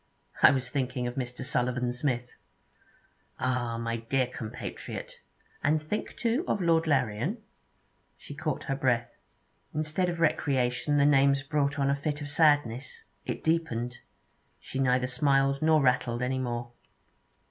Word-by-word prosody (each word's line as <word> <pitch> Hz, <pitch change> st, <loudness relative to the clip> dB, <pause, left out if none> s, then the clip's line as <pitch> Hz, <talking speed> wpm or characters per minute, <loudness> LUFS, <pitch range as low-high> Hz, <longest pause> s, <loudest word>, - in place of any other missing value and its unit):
'I -, -, +10 dB
was 130 Hz, -2 st, -2 dB
thinking 130 Hz, -2 st, -1 dB
of 120 Hz, -, -2 dB
Mr. 125 Hz, -1 st, -4 dB
Sullivan 125 Hz, -1 st, 0 dB
Smith.' 125 Hz, -2 st, -2 dB, 1.0 s
'Ah! 125 Hz, -2 st, -1 dB
my 115 Hz, 0 st, -2 dB
dear 130 Hz, +3 st, 0 dB
compatriot! 120 Hz, -3 st, -7 dB, 0.4 s
And 155 Hz, +2 st, +3 dB
think, 155 Hz, +8 st, -4 dB
too, 240 Hz, +7 st, 0 dB
of -, -, +1 dB
Lord 165 Hz, -2 st, +2 dB
Larrian.' 130 Hz, -, +1 dB, 0.8 s
She -, -, -10 dB
caught -, -, -3 dB
her 135 Hz, -, -2 dB
breath. 120 Hz, -3 st, +1 dB, 0.6 s
Instead 155 Hz, +4 st, 0 dB
of 170 Hz, -1 st, -4 dB
recreation, 140 Hz, -3 st, +1 dB
the 140 Hz, -, +5 dB
names 140 Hz, -1 st, +4 dB
brought 145 Hz, 0 st, 0 dB
on 140 Hz, -1 st, +2 dB
a -, -, +2 dB
fit 145 Hz, +1 st, -3 dB
of 145 Hz, -1 st, -5 dB
sadness. 145 Hz, -5 st, +2 dB, 0.2 s
It -, -, -3 dB
deepened; 125 Hz, -8 st, -1 dB, 0.6 s
shy 135 Hz, -, -6 dB
neither 125 Hz, -1 st, +3 dB
smiled 135 Hz, +1 st, +2 dB
nor 155 Hz, -2 st, +4 dB
rattled 125 Hz, -2 st, +1 dB
any 130 Hz, +1 st, 0 dB
more. 120 Hz, -1 st, -3 dB
135 Hz, 140 wpm, -29 LUFS, 125-150 Hz, 1.0 s, I